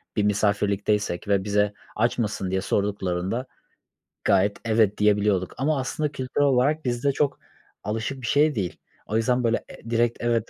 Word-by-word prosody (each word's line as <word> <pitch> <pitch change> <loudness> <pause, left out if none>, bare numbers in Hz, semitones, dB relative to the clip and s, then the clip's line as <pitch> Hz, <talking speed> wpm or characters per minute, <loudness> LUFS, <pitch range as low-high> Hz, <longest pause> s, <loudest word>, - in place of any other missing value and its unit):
bir 105 - +2
misafirlikteysek 105 -2 0
ve 100 -2 +2
bize, 105 0 +1 0.2
"Aç 115 +3 +1
mısın?" 105 -5 -2
diye 95 0 0
sorduklarında 100 +3 -1 0.8
gayet, 100 +2 +3
"Evet" 110 -2 +2
diyebiliyorduk 105 -3 +2
ama 145 +2 +1
aslında 145 +3 -2
kültürel 135 +1 0
olarak 140 +3 +2
bizde 125 +3 +1
çok 140 +1 0 0.4
alışık 110 +6 -3
bir 120 - -4
şey 150 +2 +3
değil. 95 -5 -3 0.3
O 110 - -1
yüzden, 125 +2 +1
böyle, 115 0 0
e 115 - -11
direkt 115 0 +1
evet, 115 -2 0
110 Hz, 155 wpm, -25 LUFS, 100-125 Hz, 0.8 s, gayet